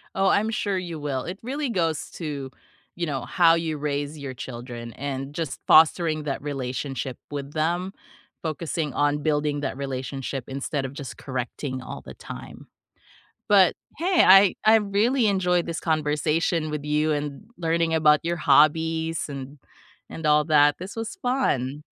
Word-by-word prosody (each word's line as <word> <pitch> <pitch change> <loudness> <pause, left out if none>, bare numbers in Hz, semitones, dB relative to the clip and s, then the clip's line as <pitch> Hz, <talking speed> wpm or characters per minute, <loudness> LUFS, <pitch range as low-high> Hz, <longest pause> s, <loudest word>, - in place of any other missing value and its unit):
Oh, 195 0 +2
I'm 215 +2 +2
sure 205 -4 -1
you 175 -3 -4
will. 140 -3 -2
It 185 +2 -6
really 275 +3 -2
goes 165 -8 -1
to, 145 -5 -5 0.5
you 175 - -2
know, 140 -4 -3
how 170 -2 +4
you 160 -2 -2
raise 145 +1 -3
your 140 -2 -6
children, 120 -2 -7
and 135 0 -5
just 160 -5 -3
fostering 160 0 +5
that 140 -2 -3
relationship 135 -2 -4
with 140 -1 -5
them, 175 +4 0 0.5
focusing 160 -2 -3
on 145 0 +1
building 150 -1 0
that - - -3
relationship 135 -1 -4
instead 135 +1 -3
of 135 - -6
just 130 -8 -8
correcting 130 +1 -4
all - - -8
the - - -10
time. - - -10 0.8
But 195 -3 +6 0.2
hey, 355 +2 +3
I 195 0 +7
I 220 +1 +7
really 220 +4 +2
enjoyed 180 -3 +2
this 165 -1 -4
conversation 155 +1 0
with 150 -1 -4
you, 150 +1 +1
and 145 +3 -3
l - - -24
learning 165 -1 +1
about 150 -2 +5
your 170 +1 -1
hobbies, 160 +2 +3
and 140 0 -7 0.5
and 160 - -8
all 150 0 +4
that, 145 -2 +4
this 185 +3 -7
was 225 +1 -5
fun. 150 - 0
150 Hz, 160 wpm, -25 LUFS, 140-170 Hz, 0.8 s, I